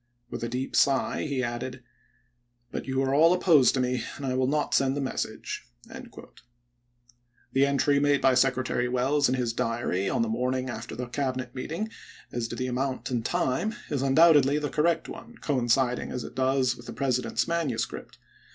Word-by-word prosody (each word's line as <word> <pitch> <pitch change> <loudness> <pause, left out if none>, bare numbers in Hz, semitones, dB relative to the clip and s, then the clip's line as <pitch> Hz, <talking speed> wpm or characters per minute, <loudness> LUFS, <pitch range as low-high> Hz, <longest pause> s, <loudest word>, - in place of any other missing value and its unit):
With - - -5
a 115 - -2
deep 125 +2 -3
sigh 140 +2 +2
he 135 -2 -1
added, 120 +1 -3
'Trlbul?? 130 - -19 0.9
'But - - -5
you 130 0 0
are 135 0 0
all 165 +5 +6
opposed 165 -8 +4
to - - 0
me, 125 -1 0
and 140 - -6
I 130 - -1
will 130 0 +1
not 150 +2 0
Sei885?3' - - -2
send 135 0 +2
the - - -1
message.'" 130 - -4 1.9
The 135 +1 +4
entry 140 +1 +2
made 145 0 +3
by 135 - +4
Secretary 125 -1 +1
Welles 135 +3 +2
in 130 - +1
his 120 -3 -1
diary 115 -5 -1
on 230 - +1
the - - -1
morning 130 - -1
after - - -7
the 125 - -4
Cabinet 130 -1 -3
meeting, 165 +10 -4 0.4
as 120 -1 -2
to 120 - -6
the 130 - -2
amount 130 +1 -2
and 120 -2 -1
time, 210 - 0 0.2
is 140 -3 0
undoubtedly 145 0 +5
the 150 -1 -2
correct 165 +2 +1
one, 235 0 -10
coinciding 125 -2 0
as 125 - -4
it - - -9
does 130 -1 +1
with 120 0 -13
the - - -6
President's 130 -2 0
manuscript. 165 -8 -3
130 Hz, 185 wpm, -27 LUFS, 125-145 Hz, 1.9 s, all